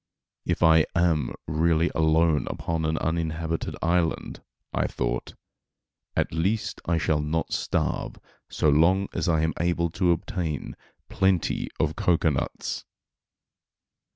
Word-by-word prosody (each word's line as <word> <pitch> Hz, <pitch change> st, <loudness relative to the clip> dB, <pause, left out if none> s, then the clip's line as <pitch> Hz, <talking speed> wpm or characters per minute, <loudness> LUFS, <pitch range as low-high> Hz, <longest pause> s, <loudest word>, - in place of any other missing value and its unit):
"If -, -, 0 dB
I 80 Hz, -1 st, +6 dB
am 85 Hz, -6 st, +1 dB
really 80 Hz, +2 st, +2 dB
alone 80 Hz, 0 st, +3 dB
upon 80 Hz, -1 st, -2 dB
an 80 Hz, 0 st, 0 dB
uninhabited 80 Hz, 0 st, -2 dB
island," 85 Hz, 0 st, 0 dB, 0.3 s
I -, -, +1 dB
thought, -, -, -3 dB, 0.8 s
"at -, -, 0 dB
least 95 Hz, +7 st, -1 dB
I 85 Hz, -1 st, +2 dB
shall 80 Hz, -1 st, +1 dB
not 80 Hz, +2 st, -2 dB
starve -, -, -1 dB, 0.3 s
so -, -, 0 dB
long 85 Hz, +7 st, +3 dB
as 90 Hz, -, -1 dB
I 80 Hz, -2 st, +3 dB
am 80 Hz, -1 st, +1 dB
able 85 Hz, -1 st, +1 dB
to 90 Hz, +1 st, +2 dB
obtain 85 Hz, -, -3 dB, 0.3 s
plenty 95 Hz, -3 st, +1 dB
of -, -, +1 dB
cocoanuts." 80 Hz, -5 st, 0 dB
80 Hz, 120 wpm, -26 LUFS, 80-85 Hz, 0.8 s, I